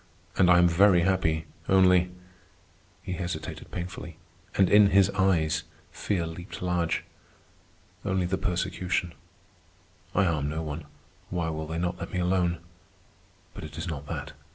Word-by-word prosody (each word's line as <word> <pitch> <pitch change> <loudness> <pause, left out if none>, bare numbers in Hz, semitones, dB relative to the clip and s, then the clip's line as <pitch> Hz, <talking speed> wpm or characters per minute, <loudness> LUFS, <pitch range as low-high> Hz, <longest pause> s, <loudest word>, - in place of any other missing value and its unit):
And 90 -2 +4
I 90 - +7
am 90 0 +6
very 90 +1 +5
happy, 85 -3 +1 0.2
only.. 90 -1 +5 0.5
." - - -33
he 90 - -4
hesitated 85 -3 -5
painfully, 85 -2 -6 0.4
and 95 - +5
in 105 +1 +7
his 100 0 +4
eyes 95 -5 +2 0.3
fear 90 -5 -1
leaped 85 +3 -8
large. 85 -2 0 1.0
"Only 95 -1 0
the 95 +2 -1
persecution. 90 -2 -1 1.0
I 100 - +4
harm 75 -5 0
no 80 +2 -3
one. 75 0 -5 0.4
Why 85 -2 -1
will 80 -1 -4
they 80 +1 -4
not 90 +1 -2
let - - -6
me - - -3
alone? 90 -1 +1 1.0
But - - -9
it - - -9
is - - -4
not 75 -3 -5
that. - - -5
90 Hz, 150 wpm, -27 LUFS, 80-95 Hz, 1.0 s, I